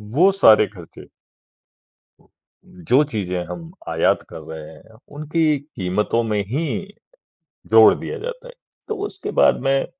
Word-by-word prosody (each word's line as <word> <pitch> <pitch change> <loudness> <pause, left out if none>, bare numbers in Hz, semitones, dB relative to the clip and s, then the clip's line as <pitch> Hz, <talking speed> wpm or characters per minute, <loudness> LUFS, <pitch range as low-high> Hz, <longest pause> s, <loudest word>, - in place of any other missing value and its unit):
वो 185 +6 +5
सारे 110 - +5
खर्चे 90 -4 -14 1.6
जो 120 - +1
चीज़ें 90 -4 -3
हम 165 -1 -8 0.2
आयात 80 0 +1
कर - - -9
रहे 80 0 -9
हैं, 110 +8 -18 0.2
उनकी 155 0 0
कीमतों 105 -4 -2
में 105 -2 -1
ही 145 +9 -2 1.1
जोड़ - - +7
दिया 460 - -6
जाता - - -7
है। - - -12 0.4
तो 430 - -2
उसके 400 0 -7
बाद - - +4
में 135 0 +1
135 Hz, 130 wpm, -21 LUFS, -, 1.6 s, जोड़